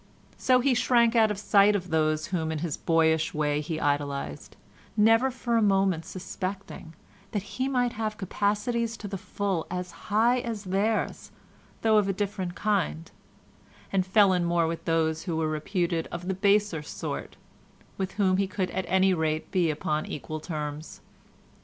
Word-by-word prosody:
So 255 Hz, -1 st, +4 dB
he 270 Hz, +1 st, +3 dB
shrank 235 Hz, -1 st, +3 dB
out 220 Hz, -2 st, +5 dB
of 210 Hz, -, -2 dB
sight 205 Hz, 0 st, +4 dB
of 185 Hz, -3 st, -3 dB
those 155 Hz, -1 st, +1 dB
whom 160 Hz, -3 st, 0 dB
in 160 Hz, -, -2 dB
his 155 Hz, -1 st, -2 dB
boyish 160 Hz, -1 st, +2 dB
way 150 Hz, -1 st, +1 dB
he 160 Hz, +1 st, -4 dB
idolised, 140 Hz, -, -2 dB, 0.4 s
never 225 Hz, +5 st, +5 dB
for 240 Hz, -2 st, -1 dB
a -, -, +3 dB
moment 195 Hz, -5 st, +2 dB
suspecting 185 Hz, -2 st, -6 dB, 0.4 s
that 205 Hz, -3 st, -1 dB
he 255 Hz, +6 st, -3 dB
might 245 Hz, -3 st, +1 dB
have 215 Hz, -1 st, -3 dB
capacities 210 Hz, +4 st, -1 dB
to 210 Hz, -, -7 dB
the 195 Hz, -1 st, -5 dB
full 195 Hz, -3 st, -2 dB
as 180 Hz, -1 st, -4 dB, 0.2 s
high 230 Hz, +4 st, +3 dB
as 230 Hz, -4 st, -4 dB
theirs 200 Hz, +4 st, -1 dB, 0.5 s
though 220 Hz, -1 st, +5 dB
of 200 Hz, -, 0 dB
a 195 Hz, -, +1 dB
different 190 Hz, -2 st, -3 dB
kind, 80 Hz, -, -1 dB, 0.8 s
and 190 Hz, -1 st, +3 dB
fell 195 Hz, +1 st, +4 dB
in 180 Hz, -1 st, +1 dB
more 170 Hz, -1 st, +2 dB
with 165 Hz, 0 st, -4 dB
those 160 Hz, -1 st, 0 dB
who 165 Hz, -3 st, -2 dB
were 160 Hz, -1 st, 0 dB
reputed 165 Hz, +2 st, -1 dB
of 175 Hz, +1 st, -6 dB
the 190 Hz, -, 0 dB
baser 200 Hz, -3 st, +2 dB
sort, 150 Hz, -, -6 dB, 0.6 s
with 190 Hz, 0 st, -2 dB
whom 190 Hz, -2 st, +2 dB
he 195 Hz, 0 st, +1 dB
could 190 Hz, -1 st, -2 dB
at 190 Hz, -, -2 dB
any 190 Hz, +1 st, +3 dB
rate 160 Hz, -2 st, -1 dB
be 175 Hz, -3 st, +2 dB
upon 150 Hz, 0 st, -1 dB
equal 155 Hz, +4 st, -5 dB
terms. 150 Hz, -1 st, -6 dB
185 Hz, 170 wpm, -27 LUFS, 160-210 Hz, 0.8 s, out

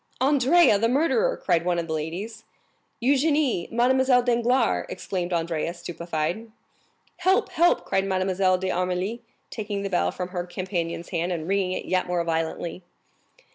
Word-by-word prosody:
"Andrea, 270 Hz, -1 st, +4 dB
the 230 Hz, +2 st, +2 dB
murderer!" 330 Hz, -, +2 dB
cried 165 Hz, -1 st, +1 dB
one 175 Hz, 0 st, 0 dB
of 170 Hz, -, -1 dB
the 160 Hz, -, -4 dB
ladies. 185 Hz, +9 st, -5 dB, 0.6 s
"Eugénie! 280 Hz, -, +2 dB
Mademoiselle 250 Hz, +1 st, +3 dB
Danglars!" 240 Hz, 0 st, +1 dB
exclaimed 180 Hz, -2 st, -4 dB
Andrea, 170 Hz, 0 st, -1 dB
stupefied. 170 Hz, +4 st, -4 dB, 0.7 s
"Help, 375 Hz, +1 st, +2 dB
help!" 345 Hz, +2 st, +3 dB
cried 195 Hz, 0 st, 0 dB
Mademoiselle 185 Hz, -1 st, +1 dB
d'Armilly, 185 Hz, +4 st, -2 dB, 0.3 s
taking 205 Hz, -2 st, -4 dB
the 195 Hz, -, -4 dB
bell 175 Hz, -, +2 dB
from 180 Hz, 0 st, -5 dB
her 180 Hz, -1 st, -4 dB
companion's 175 Hz, -2 st, -4 dB
hand, 175 Hz, 0 st, -1 dB
and 165 Hz, -2 st, -3 dB
ringing 190 Hz, -1 st, 0 dB
it -, -, -4 dB
yet 185 Hz, 0 st, 0 dB
more 175 Hz, -1 st, 0 dB
violently. 165 Hz, +1 st, -3 dB
190 Hz, 140 wpm, -25 LUFS, 175-240 Hz, 0.7 s, Andrea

